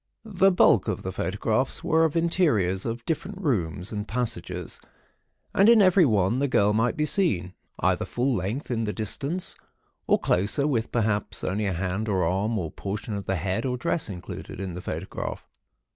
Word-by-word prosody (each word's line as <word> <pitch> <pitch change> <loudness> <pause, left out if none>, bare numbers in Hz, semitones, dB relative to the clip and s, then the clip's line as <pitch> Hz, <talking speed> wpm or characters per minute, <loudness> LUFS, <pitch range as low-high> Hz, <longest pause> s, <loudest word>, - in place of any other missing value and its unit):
The 195 -3 +3
bulk 180 - +4
of - - -2
the - - -3
photographs - - -1
were 160 +1 +3
of 160 +1 0
interiors 120 - +1
of 115 +1 -4
different 180 +4 -3
rooms 95 - -1
and 105 -1 -4
passages, 90 -7 -4 0.7
and 200 +3 +5
in 235 -1 +7
every 185 -3 +6
one 105 +1 +2
the 140 - +1
girl 105 -5 +3
might 115 +2 +1
be 150 - +1
seen, 95 - +1 0.3
either - - +1
full 125 +2 0
length 110 +9 -3
in 115 -2 0
the 105 - -2
distance, 140 - -2 0.5
or - - +5
closer, 105 +10 +1
with, 120 -6 0
perhaps, 105 -3 -1
only 105 +2 -1
a 95 - 0
hand 95 +5 -2
or 95 -4 +1
arm, 100 +6 0
or 85 -6 -3
portion 105 +2 -5
of 100 -1 -5
the 95 - +1
head 95 +6 -1
or 125 -1 -1
dress 160 -1 -1
included 90 -1 -7
in 95 -1 -4
the 90 - -6
photograph. 90 +1 -5
110 Hz, 180 wpm, -26 LUFS, 95-145 Hz, 0.7 s, in